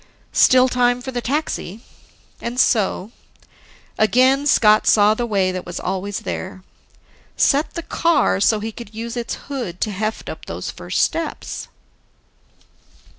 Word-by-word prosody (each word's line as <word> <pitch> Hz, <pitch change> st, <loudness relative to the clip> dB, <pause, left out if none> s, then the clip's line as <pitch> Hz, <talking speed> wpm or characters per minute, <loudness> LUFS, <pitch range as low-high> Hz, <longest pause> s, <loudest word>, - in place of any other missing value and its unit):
Still 255 Hz, 0 st, +5 dB
time 245 Hz, -1 st, +2 dB
for 265 Hz, +2 st, -6 dB
the 245 Hz, -1 st, -3 dB
taxi. 235 Hz, -, -3 dB, 0.6 s
And 240 Hz, +2 st, -4 dB
so, 210 Hz, -3 st, +1 dB, 0.9 s
again 255 Hz, +6 st, +3 dB
Scott 215 Hz, -6 st, +4 dB
saw 210 Hz, 0 st, +5 dB
the 235 Hz, +2 st, -3 dB
way 195 Hz, -4 st, +1 dB
that 185 Hz, -1 st, -5 dB
was 175 Hz, 0 st, -6 dB
always 195 Hz, +2 st, -3 dB
there: 190 Hz, 0 st, -6 dB, 0.7 s
Set 285 Hz, +2 st, +2 dB
the 335 Hz, -, -4 dB
car 330 Hz, -12 st, +1 dB
so 215 Hz, +2 st, +3 dB
he 220 Hz, +2 st, -4 dB
could 220 Hz, -1 st, -11 dB
use 230 Hz, +2 st, -5 dB
its 240 Hz, -1 st, -3 dB
hood 240 Hz, -11 st, -5 dB
to 215 Hz, -, 0 dB
heft 215 Hz, +3 st, -3 dB
up -, -, -7 dB
those -, -, -5 dB
first -, -, -1 dB
steps. 330 Hz, -1 st, -3 dB
230 Hz, 140 wpm, -20 LUFS, 205-255 Hz, 0.9 s, Still